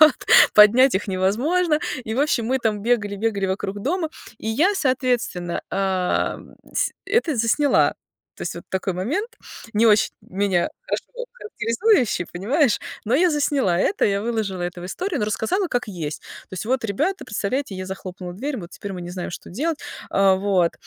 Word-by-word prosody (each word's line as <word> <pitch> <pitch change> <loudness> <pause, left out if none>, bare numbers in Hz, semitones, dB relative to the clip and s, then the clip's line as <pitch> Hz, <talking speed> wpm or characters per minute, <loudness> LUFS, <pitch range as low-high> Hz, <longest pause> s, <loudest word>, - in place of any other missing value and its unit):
вот, 310 -4 +8 0.4
поднять 235 +6 +7
их 190 - 0
невозможно. 270 - +1 0.3
И, 220 - -3
в 260 - +1
общем, 275 -6 +1
мы 260 +2 +1
там 215 -4 -1
бегали, 215 -3 +1
бегали 200 -2 0
вокруг 195 +1 -3
дома, 330 - 0 0.3
и 220 - -5
я, 320 - +3
соответственно, 245 - 0
э, 190 -2 0 0.4
тс - - +1
это 395 - +1
засняла. 235 +6 +3 0.4
То - - -8
есть - - -3
вот - - -9
такой 190 0 -1
момент, 285 - -2 0.4
не 220 +2 +4
очень 210 -1 +4
меня 190 - 0
хорошо - - -4
характеризующий, 385 - +1
понимаешь, 240 - +2 0.3
но 235 - +2
я 350 +5 +4
засняла 280 - +1
это, 385 - +1
я 200 -1 +2
выложила 215 -4 -2
это 175 0 -4
в - - -7
историю, 355 - -3
но 210 - +2
рассказала, 340 - 0
как 245 -5 -1
есть. 160 -6 -5 0.3
То - - -34
есть 185 +3 -5
вот, 255 0 0
ребята, 300 - -1
представляете, 215 +2 -2
я 185 0 -5
захлопнула 185 -1 -7
дверь, 265 +7 -3
вот 175 -4 -8
теперь 200 - -7
мы 180 - -6
не 175 - -7
знаем, 180 -1 -5
что - - -8
делать. 300 - -2 0.3
А, 195 -1 +4
вот. 190 -3 +2
220 Hz, 175 wpm, -22 LUFS, 190-285 Hz, 0.4 s, вот